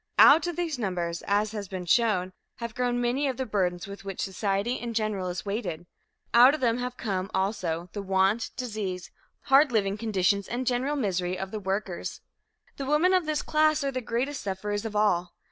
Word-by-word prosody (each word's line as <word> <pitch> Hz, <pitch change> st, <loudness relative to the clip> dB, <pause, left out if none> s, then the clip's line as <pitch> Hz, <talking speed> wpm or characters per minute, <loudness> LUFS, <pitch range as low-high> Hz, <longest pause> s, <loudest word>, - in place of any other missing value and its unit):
Out 305 Hz, +4 st, +8 dB
of 350 Hz, -, -3 dB
these 330 Hz, -6 st, -2 dB
numbers, 175 Hz, -5 st, -2 dB
as 205 Hz, +1 st, +2 dB
has 210 Hz, -2 st, -5 dB
been 185 Hz, -1 st, -5 dB
shown, 185 Hz, -2 st, +2 dB, 0.2 s
have 235 Hz, -1 st, -6 dB
grown 245 Hz, +1 st, 0 dB
many 245 Hz, +4 st, +1 dB
of 260 Hz, -, -2 dB
the 260 Hz, -, -2 dB
burdens 180 Hz, -5 st, -1 dB
with 200 Hz, 0 st, -9 dB
which 195 Hz, -1 st, -6 dB
society 200 Hz, +3 st, -1 dB
in 235 Hz, -1 st, -5 dB
general 215 Hz, -4 st, -1 dB
is 180 Hz, +2 st, -4 dB
weighted; 190 Hz, -5 st, -3 dB, 0.5 s
out 250 Hz, +5 st, +8 dB
of -, -, -6 dB
them 235 Hz, -1 st, +1 dB
have 250 Hz, 0 st, -4 dB
come, 195 Hz, -3 st, -2 dB
also, 180 Hz, -4 st, -1 dB
the 205 Hz, -, -4 dB
want, 195 Hz, +3 st, +1 dB
disease, 205 Hz, -7 st, -4 dB, 0.3 s
hard 275 Hz, +1 st, +5 dB
living 205 Hz, -2 st, 0 dB
conditions 200 Hz, -3 st, +1 dB
and 250 Hz, +2 st, -3 dB
general 255 Hz, +4 st, 0 dB
misery 185 Hz, -7 st, -1 dB
of 190 Hz, +1 st, -5 dB
the 215 Hz, -, -4 dB
workers. 190 Hz, -2 st, -3 dB, 0.6 s
The 275 Hz, -, -4 dB
women 310 Hz, +6 st, +3 dB
of 365 Hz, -4 st, +2 dB
this 310 Hz, -1 st, 0 dB
class 310 Hz, -1 st, +2 dB
are 275 Hz, -, 0 dB
the 255 Hz, -1 st, -3 dB
greatest 250 Hz, +4 st, -2 dB
sufferers 205 Hz, +2 st, -3 dB
of 215 Hz, -1 st, -5 dB
all. 180 Hz, -4 st, +1 dB
215 Hz, 195 wpm, -27 LUFS, 190-250 Hz, 0.6 s, Out